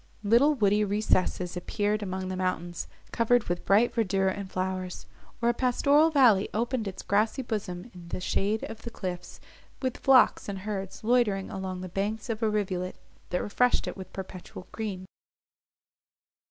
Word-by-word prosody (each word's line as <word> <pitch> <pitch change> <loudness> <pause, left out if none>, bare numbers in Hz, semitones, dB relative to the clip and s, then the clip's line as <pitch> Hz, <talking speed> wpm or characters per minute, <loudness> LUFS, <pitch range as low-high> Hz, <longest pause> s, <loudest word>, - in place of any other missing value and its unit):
Little 240 +8 +5
woody 210 -3 +3
recesses 195 -3 0
appeared 205 +4 -1
among 190 -1 -3
the 185 - -3
mountains, 175 -2 -2 0.2
covered 235 0 +3
with 175 0 -3
bright 215 +5 +4
verdure 195 -3 +1
and 200 -1 -6
flowers; 185 -1 -3 0.4
or 235 - +4
a - - +3
pastoral 280 +5 +4
valley 245 -10 +5
opened 235 0 -1
its 190 - -6
grassy 220 +6 +1
bosom 210 -2 -4
in 175 -2 -11
the 170 - -4
shade 205 +4 0
of 225 0 -7
the 235 - -6
cliffs, 180 -5 -6 0.4
with 255 -2 -2
flocks 265 -5 +4
and 200 - -3
herds 195 -2 -4
loitering 215 -5 +2
along 190 -1 -4
the 185 - -5
banks 210 +6 -2
of 220 0 -4
a 220 - +2
rivulet, 185 -3 -1 0.3
that 180 - -1
refreshed 245 +4 +2
it - - -4
with 190 -2 -9
perpetual 185 -1 -8
green. 200 -4 -4
205 Hz, 160 wpm, -28 LUFS, 185-230 Hz, 0.4 s, Little